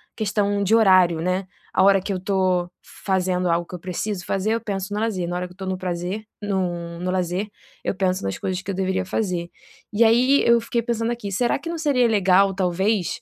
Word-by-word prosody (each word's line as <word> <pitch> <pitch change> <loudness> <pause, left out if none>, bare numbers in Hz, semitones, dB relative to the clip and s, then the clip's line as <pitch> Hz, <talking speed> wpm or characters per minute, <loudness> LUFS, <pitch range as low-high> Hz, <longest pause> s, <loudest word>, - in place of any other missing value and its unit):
questão 205 -1 0
de 210 +3 +3
horário, 185 -6 +5
né. 185 +2 -1 0.3
A 185 - +3
hora 195 0 +5
que 195 - -4
eu 185 - -3
tô 185 -2 0 0.4
fazendo 185 -2 +1
algo 170 +1 +1
que - - -8
eu - - -7
preciso 185 +2 -4
fazer, 195 +3 -1
eu 230 - -3
penso 200 -2 -4
no 210 - -1
lazer. 205 -6 -1
Na 175 - -3
hora 180 - -3
que - - -18
eu - - -25
estou 190 0 -7
no 185 0 -2
prazer 185 +3 -4 0.2
no 175 -4 -2
no 180 +1 -3
lazer, 185 +2 -1 0.4
eu - - -1
penso 185 -1 0
nas 95 0 -2
coisas 185 -1 -2
que 200 - -10
eu - - -4
deveria 190 0 -1
fazer. 180 -3 -2 0.4
E 215 +3 +4
aí 245 +5 +4
eu 235 0 +5
fiquei 235 +1 -1
pensando 230 0 -1
aqui, 220 -4 -5
será 240 +5 +1
que 290 - -7
não 335 - -3
seria 275 -6 +3
legal, 195 -2 +4
talvez, 190 +1 0
190 Hz, 225 wpm, -23 LUFS, 180-215 Hz, 0.4 s, horário